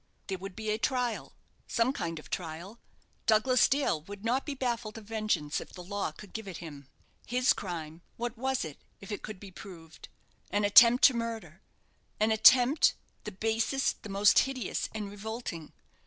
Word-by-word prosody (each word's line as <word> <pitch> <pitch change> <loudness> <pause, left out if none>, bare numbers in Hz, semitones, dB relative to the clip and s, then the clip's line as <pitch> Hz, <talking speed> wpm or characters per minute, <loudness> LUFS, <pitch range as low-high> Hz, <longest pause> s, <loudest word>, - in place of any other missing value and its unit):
There 190 -2 -4
would 195 0 -8
be 220 -1 -3
a 215 - -1
trial 250 -1 -1 0.3
some 235 +3 +1
kind 170 -9 -4
of 155 - -11
trial! 180 +6 -5 0.5
Douglas 225 +4 +4
Dale 275 - +1
would 200 +5 -10
not 255 +5 0
be 290 - -3
baffled 235 -4 -3
of 220 - -10
vengeance 215 -9 -1
if - - -12
the 180 - -9
law 200 -2 -3
could 195 +5 -14
give 220 -2 -6
it 185 - -6
him. 145 -5 -10 0.4
His 250 +2 +3
crime 165 -3 -6 0.2
what 240 0 -3
was 265 -3 -1
it, 150 -3 -9 0.2
if 195 - -10
it 205 - -4
could 215 -3 -8
be 195 -1 -11
proved? 165 -4 -12 0.4
An 205 0 +1
attempt 235 +4 +7
to 265 - +8
murder 230 -1 -5 0.6
an 215 +1 +3
attempt 250 +6 +6 0.3
the 210 - -4
basest, 225 +6 0
the 210 - -9
most 200 +1 +5
hideous, 260 -6 -2
and 215 -2 -4
revolting. 205 -5 -6
215 Hz, 175 wpm, -30 LUFS, 185-235 Hz, 0.6 s, to